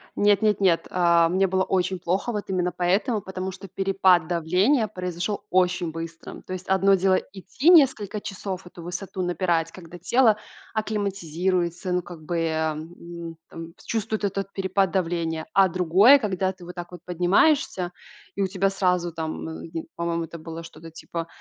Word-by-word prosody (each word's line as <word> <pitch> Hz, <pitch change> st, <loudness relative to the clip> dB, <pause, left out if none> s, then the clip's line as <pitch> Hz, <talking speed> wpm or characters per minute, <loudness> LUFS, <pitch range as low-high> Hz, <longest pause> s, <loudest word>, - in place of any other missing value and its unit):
Нет, 205 Hz, 0 st, +3 dB
нет, 210 Hz, -2 st, +2 dB
нет. 180 Hz, -4 st, +3 dB
А, 170 Hz, -2 st, +4 dB
мне 190 Hz, +3 st, +2 dB
было 190 Hz, 0 st, +1 dB
очень 185 Hz, 0 st, 0 dB
плохо, 185 Hz, +7 st, -1 dB
вот 210 Hz, -3 st, -4 dB
именно 180 Hz, -1 st, 0 dB
поэтому, 195 Hz, +7 st, +1 dB
потому 190 Hz, 0 st, -5 dB
что 195 Hz, +2 st, -10 dB
перепад 190 Hz, -3 st, +3 dB
давления 180 Hz, -, +2 dB
произошёл 180 Hz, +1 st, -4 dB
очень 180 Hz, -2 st, +1 dB
быстро. 165 Hz, 0 st, -8 dB
То 185 Hz, -, -6 dB
есть 185 Hz, 0 st, -7 dB
одно 190 Hz, +1 st, +4 dB
дело 190 Hz, 0 st, +3 dB, 0.2 s
идти 205 Hz, -, 0 dB
несколько 260 Hz, -, +4 dB
часов, 190 Hz, -2 st, -6 dB
эту 175 Hz, -1 st, -11 dB
высоту 185 Hz, +2 st, -4 dB
напирать, 170 Hz, -2 st, 0 dB
когда 175 Hz, -1 st, -11 dB
тело 225 Hz, +4 st, +3 dB, 0.4 s
акклиматизируется, 185 Hz, -4 st, -1 dB
ну 180 Hz, 0 st, +1 dB
как 175 Hz, -2 st, -10 dB
бы, 165 Hz, 0 st, -1 dB
а, 160 Hz, 0 st, 0 dB
м, 170 Hz, +1 st, -9 dB
там, 165 Hz, 0 st, -9 dB
чувствует 220 Hz, -1 st, -2 dB
этот 195 Hz, 0 st, -2 dB
перепад 195 Hz, 0 st, +1 dB
давления. 165 Hz, -3 st, -1 dB
А 195 Hz, -1 st, +6 dB
другое, 185 Hz, -, +6 dB
когда 190 Hz, -5 st, -1 dB
ты 185 Hz, -1 st, -15 dB
вот 180 Hz, +1 st, -9 dB
так 175 Hz, -1 st, -7 dB
вот 180 Hz, -, -10 dB
поднимаешься 180 Hz, -, +2 dB, 0.4 s
и 200 Hz, -, 0 dB
у -, -, +1 dB
тебя 195 Hz, +1 st, +1 dB
сразу, 180 Hz, -3 st, 0 dB
там, 160 Hz, -1 st, -4 dB
э, 160 Hz, +1 st, -8 dB
в 165 Hz, -1 st, -5 dB
по-моему, 170 Hz, -1 st, -2 dB
это 170 Hz, -, -9 dB
было 165 Hz, +1 st, -8 dB
что-то 165 Hz, 0 st, -12 dB
типа 165 Hz, +1 st, -6 dB
180 Hz, 170 wpm, -25 LUFS, 170-195 Hz, 0.4 s, А